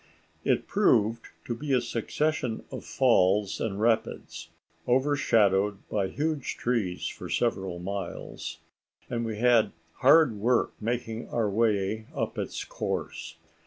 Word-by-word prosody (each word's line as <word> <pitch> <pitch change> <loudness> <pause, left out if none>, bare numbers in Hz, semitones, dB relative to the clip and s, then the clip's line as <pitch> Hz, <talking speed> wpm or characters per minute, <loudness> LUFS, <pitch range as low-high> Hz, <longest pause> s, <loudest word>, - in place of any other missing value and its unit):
It - - +1
proved 115 - +2 0.2
to 120 - -2
be 140 +4 -3
a 130 - +5
succession 120 +2 -2
of - - -6
falls 105 -5 +2
and 100 -3 -2
rapids, 115 0 -1 0.4
overshadowed 110 -7 +2
by 100 -2 0
huge 150 +5 -2
trees 110 -8 -1
for - - -7
several 95 -7 0
miles, 95 +3 -5 0.5
and 115 -1 -1
we 110 -2 -3
had 120 -1 +4 0.2
hard 140 -4 +5
work 120 +4 +2
making 115 0 -3
our 115 -3 0
way 110 0 +1
up - - -2
its - - -4
course. - - -4
115 Hz, 125 wpm, -28 LUFS, 105-125 Hz, 0.5 s, a